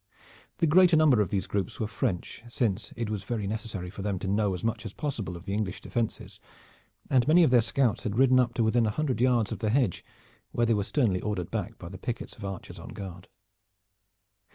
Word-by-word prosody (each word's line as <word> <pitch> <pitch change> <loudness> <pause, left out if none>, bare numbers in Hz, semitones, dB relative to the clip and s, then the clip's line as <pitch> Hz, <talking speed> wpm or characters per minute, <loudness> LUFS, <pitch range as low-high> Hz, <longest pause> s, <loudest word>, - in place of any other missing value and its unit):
The 170 - +2
greater 175 +1 +6
number 145 -8 +5
of 100 - 0
these 100 -2 -1
groups 100 -3 -3
were 110 - 0
French, 100 -2 -3
since 115 -4 -1
it 115 -1 -2
was 105 -3 -3
very 110 -1 -3
necessary 105 -4 -4
for 100 - -8
them 100 -1 -1
to 95 - -4
know 100 -1 +1
as 90 - -8
much 115 +1 -1
as 110 -3 -7
possible 110 - -4
of 85 - -13
the 100 - -3
English 105 -3 -2
defenses; 115 -3 -3 0.7
and 125 -1 +4
many 170 +3 +6
of 155 - +4
their 125 -2 +6
scouts 120 0 +1
had 110 -2 -3
ridden 130 0 +5
up 120 -2 +1
to 115 - +2
within 115 +1 +3
a - - +2
hundred 130 0 -1
yards 120 -4 +3
of 110 - -4
the 110 - 0
hedge, 120 - +1 0.5
where 120 - +2
they 115 - +3
were 105 -2 +1
sternly 100 -6 +1
ordered 105 -5 -3
back - - -3
by - - -9
the 95 +1 -9
pickets 115 +2 -5
of 105 - -12
archers 95 -2 -6
on 85 - -9
guard. 95 -3 -8
110 Hz, 225 wpm, -28 LUFS, 100-120 Hz, 0.7 s, greater